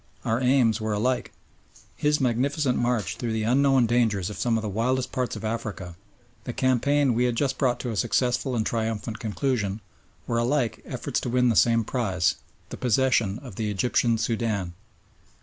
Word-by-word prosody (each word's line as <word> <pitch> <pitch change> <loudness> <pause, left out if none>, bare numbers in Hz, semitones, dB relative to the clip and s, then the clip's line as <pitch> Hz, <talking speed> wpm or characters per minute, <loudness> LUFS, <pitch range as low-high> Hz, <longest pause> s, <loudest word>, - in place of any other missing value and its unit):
Our 115 +3 0
aims 125 -4 +3
were 110 -1 -1
alike. 125 +5 0 0.6
His 150 0 +1
magnificent 130 +2 +1
march 120 -3 -1
through 115 -2 -3
the 110 -1 -1
unknown 135 +2 +3
dangers 110 -5 +1
of - - -8
some 115 -2 +1
of 110 - -3
the - - -2
wildest 125 +5 -1
parts 125 -3 -2
of 110 +1 -6
Africa, 110 -6 -4 0.5
the 120 - -5
campaign 130 +2 +2
we 120 +2 +2
had 120 -1 0
just 135 +1 -1
brought 125 -3 +1
to 125 - -3
a - - -4
successful 125 +4 0
and 110 -2 0
triumphant 110 0 -2
conclusion, 110 -3 -1 0.5
were 115 -1 0
alike 120 0 0
efforts - - -2
to - - -4
win 125 0 +3
the 115 - +1
same 115 +6 +4
prize 95 -8 0 0.3
the - - -7
possession 120 -4 +2
of 125 -8 -10
the 110 -2 -1
Egyptian 115 +3 +1
Soudan. 110 -5 -1
120 Hz, 175 wpm, -25 LUFS, 110-125 Hz, 0.6 s, same